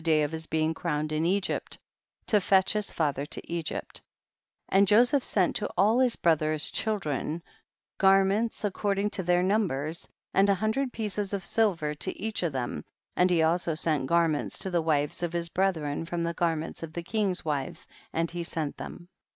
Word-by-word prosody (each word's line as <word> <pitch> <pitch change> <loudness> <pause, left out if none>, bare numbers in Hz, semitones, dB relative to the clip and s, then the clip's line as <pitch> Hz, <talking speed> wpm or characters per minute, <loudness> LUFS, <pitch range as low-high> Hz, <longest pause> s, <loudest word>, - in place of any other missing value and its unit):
day 155 -2 +3
of 150 - -2
his 160 0 -5
being 160 0 +1
crowned 155 -1 -2
in 155 +2 +1
Egypt, 195 +1 -1 0.5
to 210 -2 +3
fetch 190 0 +3
his 210 -1 -1
father 145 -4 -1
to 145 - -6
Egypt; 170 -2 -4 0.7
and 195 +1 +4
Jo 215 +4 +7
seph 265 +3 +2
sent 185 -4 +1
to 210 - -2
all 215 +6 +4
his 255 -2 +3
brothers' 155 -2 +2
children, 170 -6 -1 0.6
garments 195 +4 +3
according 200 +1 0
to - - -1
their 180 0 +2
numbers, 170 -6 -1 0.3
and 195 +1 +4
a 200 - +4
hundred 220 +7 -1
pieces 210 -3 -3
of 195 -3 -2
silver 175 -9 +1
to 150 - -4
each 220 +2 -2
of 170 -3 0
them, 120 - -3 0.3
and 180 +1 +4
he 170 -3 +3
also 165 0 +1
sent 155 -4 0
garments 165 -2 +1
to 190 - -3
the 175 -1 +2
wives 150 -2 0
of 175 -1 -2
his 170 0 -1
brethren 165 -6 0
from 170 0 -2
the 170 0 -1
garments 165 -1 -2
of 160 -1 -7
the 170 - -4
king's 195 -2 -1
wives, 145 -4 -3 0.2
and 165 0 -1
he 175 0 -4
sent 160 -3 -3
them. 175 - -8
175 Hz, 185 wpm, -28 LUFS, 155-200 Hz, 0.7 s, Jo